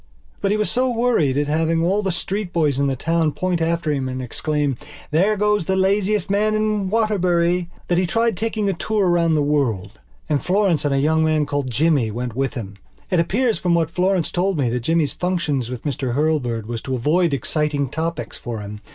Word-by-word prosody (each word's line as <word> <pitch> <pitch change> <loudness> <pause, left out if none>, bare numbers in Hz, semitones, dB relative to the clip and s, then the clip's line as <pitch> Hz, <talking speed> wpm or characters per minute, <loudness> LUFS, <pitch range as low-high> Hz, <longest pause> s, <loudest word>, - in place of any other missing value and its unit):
But 195 - +1
he 210 - +2
was 210 - 0
so 255 +1 +1
worried 230 - +1
at 145 - +2
having 165 +2 +1
all 195 +4 +2
the 195 -2 -1
street 190 +2 -3
boys 150 -6 +1
in 140 - +2
the 135 - 0
town 165 +2 0
point 180 -2 -1
after 165 -1 0
him 135 -3 -1
and 130 0 -4
exclaim: 145 +2 -1 0.4
"There 195 +7 +2
goes 210 -3 +1
the 190 - +1
laziest 195 +1 +1
man 210 +2 +1
in 215 -2 0
Waterbury!" 180 -5 +1 0.2
that 175 0 +2
he 185 - +1
tried 230 +3 +1
taking 220 +1 -1
a 195 - +1
tour 205 +2 0
round 170 -2 +3
the 150 - +2
world. 140 -10 -1 0.3
And 145 -2 0
Florence 185 -5 +1
and 145 - +1
a - - +2
young 160 +3 +2
man 155 -1 +2
called 145 -2 -2
Jimmy 140 -1 +2
went 120 +1 -4
with 135 +2 -1
him. 100 -5 -6 0.3
It 180 - +3
appears 225 +7 +1
from 175 -1 +2
what 165 -1 0
Florence 185 -1 +1
told 185 0 0
me 130 -5 +1
that 125 - -1
Jimmy's 160 +4 +1
function 175 -6 -1
with 125 -2 -6
Mr 130 -4 -2
Hurlbird 135 -7 0
was 115 0 -5
to 130 - -3
avoid 160 +7 +2
exciting 145 0 -1
topics 160 +5 -4
for 115 -3 -5
him. 105 +1 -8
165 Hz, 210 wpm, -21 LUFS, 140-190 Hz, 0.4 s, round